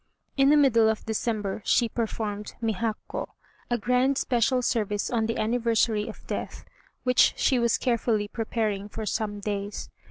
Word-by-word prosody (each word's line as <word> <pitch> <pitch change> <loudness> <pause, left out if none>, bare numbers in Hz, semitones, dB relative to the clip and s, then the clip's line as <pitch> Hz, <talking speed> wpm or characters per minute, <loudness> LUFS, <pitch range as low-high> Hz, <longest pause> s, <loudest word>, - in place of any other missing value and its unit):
In 275 0 +4
the 300 - +6
middle 230 -6 +5
of 220 - -2
December 215 -2 -2
she 240 - +3
performed 215 -2 -4
Mihakkô 225 -1 -2 0.4
(a 240 - +1
grand 250 +4 +2
special 250 0 +1
service 210 -4 0
on 225 -2 +1
the 230 - -2
anniversary 225 -1 +1
of - - -11
death), - - -5 0.4
which 250 -1 +4
she 255 - +2
was 235 -1 +2
carefully 230 -4 0
preparing 215 -2 -2
for 220 +1 -5
some 210 -1 -2
days. 205 0 -4
225 Hz, 150 wpm, -26 LUFS, 210-240 Hz, 0.4 s, the